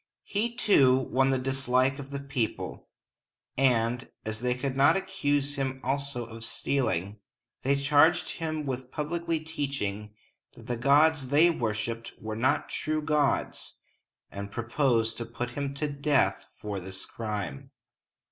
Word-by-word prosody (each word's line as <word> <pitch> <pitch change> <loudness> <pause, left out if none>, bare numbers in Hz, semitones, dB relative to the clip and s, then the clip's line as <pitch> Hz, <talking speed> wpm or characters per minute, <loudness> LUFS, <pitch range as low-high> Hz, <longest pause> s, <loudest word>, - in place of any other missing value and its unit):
He, 230 +4 -1
too, 135 - +5
won 130 0 +1
the 135 - +2
dislike 130 +1 +1
of 140 -1 -8
the 140 0 -4
people; 135 -5 -3 0.7
and, 125 -1 +2 0.2
as 110 0 -3
they 125 0 +1
could 130 +1 -3
not 140 +7 +5
accuse 145 -7 -1
him 135 -1 -2
also 135 -2 -2
of 115 0 -9
stealing, 105 -5 -1 0.4
they 140 +2 +2
charged 145 +4 +4
him 155 -2 -2
with 130 -1 -4
publicly 165 +1 -2
teaching 135 -10 -4 0.4
that 115 - -13
the 120 0 -2
gods 140 +3 +4
they 155 +6 +5
worshiped 115 -3 -3
were 110 0 -5
not 130 +6 +1
true 155 0 -2
gods, 150 -2 0 0.5
and 100 0 -6
proposed 120 -1 +1
to 115 - -4
put 120 +1 -4
him 140 +2 -3
to 150 +2 -1
death 145 0 +1
for 105 -2 -4
this 95 +1 -7
crime. 105 -10 -5
135 Hz, 140 wpm, -28 LUFS, 115-145 Hz, 0.7 s, too